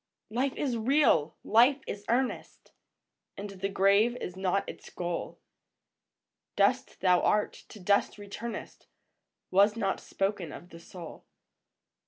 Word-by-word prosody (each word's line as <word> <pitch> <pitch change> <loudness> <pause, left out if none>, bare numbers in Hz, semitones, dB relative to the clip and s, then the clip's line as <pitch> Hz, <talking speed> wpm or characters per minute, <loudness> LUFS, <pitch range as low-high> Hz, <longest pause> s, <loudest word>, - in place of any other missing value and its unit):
Life 260 +4 0
is 255 -5 -1
real! 225 - +3
Life 245 +6 +4
is 205 0 -6
earnest! 250 +2 -2 0.7
And 200 0 -6
the 195 0 -3
grave 200 +4 +3
is 180 -7 -6
not 190 +1 0
its - - -9
goal; 175 -1 -4 1.2
Dust - - +1
thou 180 -2 +4
art, 210 - +2 0.2
to 215 - -11
dust 200 +3 +1
returnest, 210 +2 -7 0.6
Was 200 +3 +5
not 195 -4 0
spoken 195 -5 -2
of 175 - -10
the 165 - -12
soul. 170 -1 -11
200 Hz, 125 wpm, -29 LUFS, 185-230 Hz, 1.2 s, Was